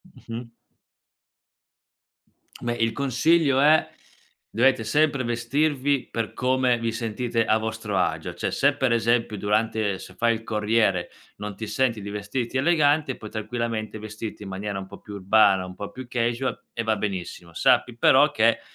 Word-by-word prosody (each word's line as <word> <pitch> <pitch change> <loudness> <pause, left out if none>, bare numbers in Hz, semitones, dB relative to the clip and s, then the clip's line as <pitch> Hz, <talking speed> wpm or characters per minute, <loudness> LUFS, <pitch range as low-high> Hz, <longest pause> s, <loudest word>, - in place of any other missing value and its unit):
Mh-mh. 115 0 -8 2.1
Beh 120 0 -1
il 115 -1 0
consiglio 140 +2 +2
è: 155 +2 +4 0.6
dovete 125 +1 +3
sempre 140 +3 +2
vestirvi 135 +3 0
per 115 -1 -3
come 130 -1 +2
vi 115 0 -2
sentite 115 +1 -1
a 110 - +3
vostro 110 -2 -3
agio. 90 - -1
Cioè, - - -3
se - - +3
per 130 -2 +1
esempio 115 -2 +1
durante 105 0 0
se 95 - -11
fai 115 +4 +2
il 110 0 -6
corriere 105 -4 +1 0.3
non 105 0 -6
ti 110 - -6
senti 120 -2 0
di 100 - -6
vestirti 105 +5 -3
elegante, 150 -2 +2
puoi 110 - -9
tranquillamente 110 0 -3
vestirti 110 0 -7
in 95 - -7
maniera 100 +1 -4
un 95 0 -6
po' - - -12
più 105 - -11
urbana, 100 -1 +4
un 90 - -9
po' 100 - -6
più 130 0 -9
casual 120 +2 -1
e 115 - -2
va 110 -1 +1
benissimo. 90 -4 -5
Sappi 120 +7 +2
però 140 +5 +5
che 115 -4 +3
115 Hz, 155 wpm, -24 LUFS, 105-130 Hz, 2.1 s, però